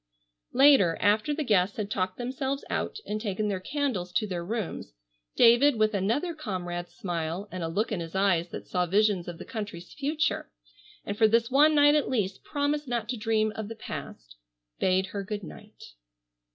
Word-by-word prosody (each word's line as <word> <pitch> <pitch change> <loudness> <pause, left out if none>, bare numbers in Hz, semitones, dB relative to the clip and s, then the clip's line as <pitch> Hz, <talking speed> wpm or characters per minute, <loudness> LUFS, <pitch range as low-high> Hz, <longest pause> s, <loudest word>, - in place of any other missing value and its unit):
Later, 265 - +6
after 215 +7 +2
the 300 +1 -1
guests 200 -5 +2
had 210 -2 -3
talked 185 -1 -1
themselves 265 +3 -3
out - - -2
and 215 +1 -3
taken 210 -1 -1
their 195 -2 -1
candles 235 -6 -2
to 215 - +1
their 180 -4 -4
rooms, 200 - -4 0.4
David 240 +4 +6
with 215 0 +2
another 230 - 0
comrade's 180 - -5
smile, 175 +2 -3
and 185 - -5
a 165 - -1
look 205 +8 -1
in 205 - -1
his 165 +1 -7
eyes 185 -3 +2
that - - -7
saw 180 -1 0
visions 200 -1 +2
of 175 -1 -6
the - - -9
country's 205 -7 -7
future, 300 +2 -1 0.6
and 205 - -3
for 220 +1 +5
this 230 +2 +2
one 300 +3 +5
night 290 0 +6
at 300 -1 +1
least 200 -6 -1
promised 290 0 -1
not 235 -3 -2
to 250 - -1
dream 215 -1 +1
of 220 -2 -5
the 225 - -7
past, - - -8 0.4
bade 185 0 +2
her 200 -1 -3
good 205 +1 -5
night. 160 - -12
210 Hz, 185 wpm, -28 LUFS, 185-255 Hz, 0.6 s, Later